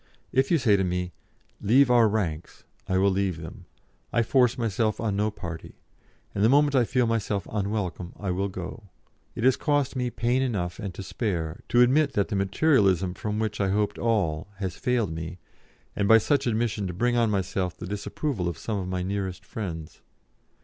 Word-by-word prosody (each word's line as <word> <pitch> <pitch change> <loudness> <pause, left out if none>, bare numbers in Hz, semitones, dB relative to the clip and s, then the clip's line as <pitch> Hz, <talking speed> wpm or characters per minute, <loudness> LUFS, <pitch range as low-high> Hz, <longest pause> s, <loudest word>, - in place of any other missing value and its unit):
If 135 +1 +2
you 170 - +4
say 120 -8 +4
to 95 - +1
me, 90 0 -2 0.5
'Leave 125 +5 +5
our 120 -2 +6
ranks,' 85 -7 -3 0.2
I 95 - +1
will 100 +1 +4
leave 95 -3 0
them; 80 -1 -9 0.5
I 120 - +2
force 125 +1 +3
myself 110 -2 0
on 105 -3 -1
no 105 +2 +1
party, 85 -6 -8 0.6
and 100 - 0
the 110 - +6
moment 145 +2 +4
I 125 -3 +4
feel 125 +1 +1
myself 110 -3 -1
unwelcome 100 -4 -2
I 100 -3 -2
will 95 +3 -1
go. 95 +3 -8 0.5
It 115 - -4
has 130 0 +5
cost 145 -3 0
me 125 -1 -1
pain 120 +3 0
enough 100 -9 -2
and 100 -4 -4
to 100 - -6
spare 90 -7 -3
to 120 - +5
admit 140 +4 +4
that 100 -4 0
the - - -2
Materialism 95 - +2
from 105 +2 -3
which 110 -2 -2
I 100 - +1
hoped 105 +1 0
all 100 -8 0
has 95 -3 -4
failed 125 -8 0
me, 80 +2 -6 0.6
and 100 - +1
by 115 - +8
such 135 +4 +1
admission 110 -3 0
to 90 - -4
bring 120 +7 +1
on 115 -2 +3
myself 95 -2 -1
the - - -7
disapproval 100 - -3
of 85 - -5
some 105 +4 -3
of 90 - -4
my 90 -1 -2
nearest 95 -1 -3
friends. 85 -8 -6
105 Hz, 190 wpm, -26 LUFS, 95-120 Hz, 0.6 s, by